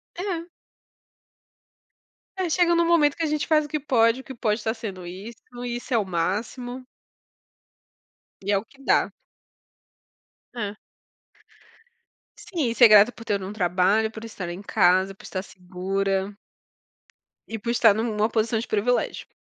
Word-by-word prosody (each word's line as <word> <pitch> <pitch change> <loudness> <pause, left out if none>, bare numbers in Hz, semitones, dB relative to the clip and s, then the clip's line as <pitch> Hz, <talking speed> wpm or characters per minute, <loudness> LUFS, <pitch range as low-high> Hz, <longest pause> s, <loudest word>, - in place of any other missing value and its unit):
É. 355 -2 -3 1.9
É, 370 -3 -1
chega 345 +1 +3
num 340 0 +3
momento 300 -4 +4
que - - -7
a - - +2
gente 300 -1 -1
faz 310 -1 +4
o - - -8
que 305 - -1
pode. 245 -3 +2
O - - -20
que 265 - -9
pode 220 -2 0
está 220 +1 -1
sendo 200 -6 -7
isso, 195 +6 -8 0.3
isso 245 +1 -4
é 235 - +4
o 210 - +1
máximo. 220 +8 -3 1.6
E 200 +1 -2
é 200 - +4
o 200 - -4
que 275 +3 -21
dá. - - +2 1.4
É. 210 -3 -4 1.6
Sim, 315 -9 -2
e - - -5
ser 240 -1 +8
grato 210 +2 +7
por 230 - -12
ter 205 -3 0
um 190 +2 -6
trabalho, 195 +3 +2
por 220 0 -9
estar 190 -6 -6
em 175 +3 -6
casa, 185 0 +3
por 195 - -18
estar 185 -1 -5
segura. 195 +2 -3 1.1
E 225 -1 -5
por 235 - -5
estar 225 -3 +5
numa 215 0 0
posição 225 0 0
de 225 - -2
privilégio. 225 +4 0
220 Hz, 155 wpm, -24 LUFS, 195-250 Hz, 1.9 s, ser